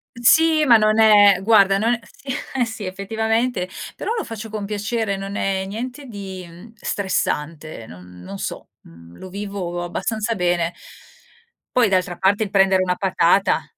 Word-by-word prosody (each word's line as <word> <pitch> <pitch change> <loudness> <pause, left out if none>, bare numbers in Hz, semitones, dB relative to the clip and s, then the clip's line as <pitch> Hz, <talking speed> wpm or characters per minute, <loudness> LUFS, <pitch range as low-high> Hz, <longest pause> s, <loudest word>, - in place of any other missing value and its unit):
Sì, 310 +6 +4
ma 235 -4 +8
non 215 0 +2
è 205 -3 +6
guarda 195 -2 +5
non 230 +3 +2
è 240 - -6
si, 275 - -18 0.3
eh 255 -2 +2
sì 220 -2 -7
effettivamente, 220 +3 -1 0.3
però - - -3
lo 445 - -2
faccio 225 -1 -7
con 210 -2 -4
piacere, 210 0 -2
non 195 +1 -6
è 190 -1 -1
niente 250 +8 -6
di 190 -3 -9
stressante, 160 - -3
non 90 -2 -13
non 95 +2 -8
so, - - -6
mhmm, 85 +1 -16
lo 185 - -10
vivo 195 -3 -5
abbastanza 215 +6 -2
bene 175 -2 0 1.0
Poi 240 -4 +5
d'altra 185 -2 0
parte 200 +3 +2
il 205 - -2
prendere 195 -1 +3
1 180 -1 0
patata, 190 0 +2
200 Hz, 155 wpm, -21 LUFS, 180-225 Hz, 1.0 s, ma